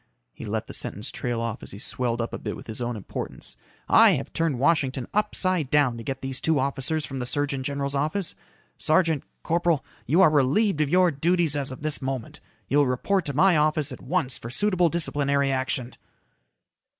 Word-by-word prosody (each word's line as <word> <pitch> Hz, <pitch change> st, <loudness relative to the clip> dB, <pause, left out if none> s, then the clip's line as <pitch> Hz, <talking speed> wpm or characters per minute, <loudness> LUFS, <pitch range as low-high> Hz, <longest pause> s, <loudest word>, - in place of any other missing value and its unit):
He -, -, -9 dB
let -, -, -2 dB
the -, -, -9 dB
sentence -, -, -6 dB
trail 120 Hz, -1 st, -3 dB
off 115 Hz, -1 st, -3 dB
as -, -, -9 dB
he 100 Hz, -, -7 dB
swelled 120 Hz, +2 st, -1 dB
up 115 Hz, -, -6 dB
a -, -, -4 dB
bit -, -, -4 dB
with -, -, -11 dB
his 110 Hz, +1 st, -7 dB
own 120 Hz, 0 st, -2 dB
importance. 105 Hz, -, -7 dB, 0.3 s
"I -, -, +7 dB
have -, -, -4 dB
turned 165 Hz, -5 st, 0 dB
Washington 135 Hz, -3 st, +1 dB
upside 185 Hz, -7 st, 0 dB
down 145 Hz, -5 st, +3 dB
to 115 Hz, -, -7 dB
get 135 Hz, +2 st, -5 dB
these 135 Hz, -1 st, -3 dB
two 160 Hz, -2 st, +2 dB
officers 140 Hz, +3 st, -1 dB
from 135 Hz, -1 st, -6 dB
the 125 Hz, -, -2 dB
surgeon 145 Hz, -1 st, -1 dB
general's 140 Hz, +1 st, -2 dB
office. 155 Hz, +7 st, -1 dB, 0.5 s
Sergeant. 160 Hz, -2 st, +2 dB, 0.2 s
Corporal. 170 Hz, -3 st, +1 dB, 0.2 s
You 165 Hz, +9 st, +4 dB
are 160 Hz, -, +6 dB
relieved 155 Hz, +6 st, +2 dB
of 150 Hz, -, +1 dB
your 180 Hz, +1 st, +4 dB
duties 165 Hz, +1 st, +1 dB
as 140 Hz, -2 st, -1 dB
of 130 Hz, +3 st, -9 dB
this 155 Hz, -1 st, -1 dB
moment. 130 Hz, -3 st, -4 dB, 0.3 s
You 145 Hz, -, +3 dB
will 145 Hz, -, +4 dB
report 175 Hz, +9 st, 0 dB
to 145 Hz, -, -3 dB
my 185 Hz, +3 st, +5 dB
office 155 Hz, -1 st, +2 dB
at -, -, -8 dB
once 135 Hz, -6 st, -1 dB
for 115 Hz, -, -7 dB
suitable 180 Hz, +4 st, +2 dB
disciplinary 140 Hz, -4 st, +1 dB
action." 130 Hz, -2 st, -1 dB
145 Hz, 200 wpm, -25 LUFS, 130-165 Hz, 0.5 s, I